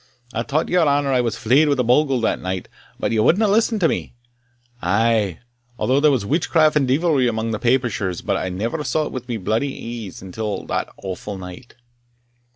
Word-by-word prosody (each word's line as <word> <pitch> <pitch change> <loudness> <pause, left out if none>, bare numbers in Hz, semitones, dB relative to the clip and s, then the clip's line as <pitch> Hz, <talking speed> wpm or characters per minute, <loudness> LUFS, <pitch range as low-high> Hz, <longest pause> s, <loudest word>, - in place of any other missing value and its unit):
I 115 - -1
tauld 145 +6 -1
your 175 -3 +3
honour 140 -1 +2
I 125 - +3
was 115 -2 -2
fleyed 135 +8 +3
wi' 140 - +3
a 125 - +2
bogle 130 +2 +3
that 115 - 0
night, 95 0 -4 0.3
but - - -1
ye 115 - +1
wadna 195 - +4
listen 220 +2 +2
to 180 -5 +3
me 125 - -3 0.7
I 110 +6 +2
aye 105 -7 0 0.4
thought 130 +3 +2
there 150 - +5
was 130 -8 +1
witchcraft 155 - +2
and 140 -3 +2
deevilry 140 -3 +2
amang 110 0 -2
the 110 - -2
Papishers, 115 -8 0
but - - +1
I 95 - -2
ne'er 115 - -3
saw't 155 0 -1
wi' 125 -2 -4
bodily 115 +2 -3
een 95 +1 -11
till 105 0 -4
that - - -2
awfu' 95 +1 -5
night." 90 +6 -10
120 Hz, 190 wpm, -21 LUFS, 110-145 Hz, 0.7 s, there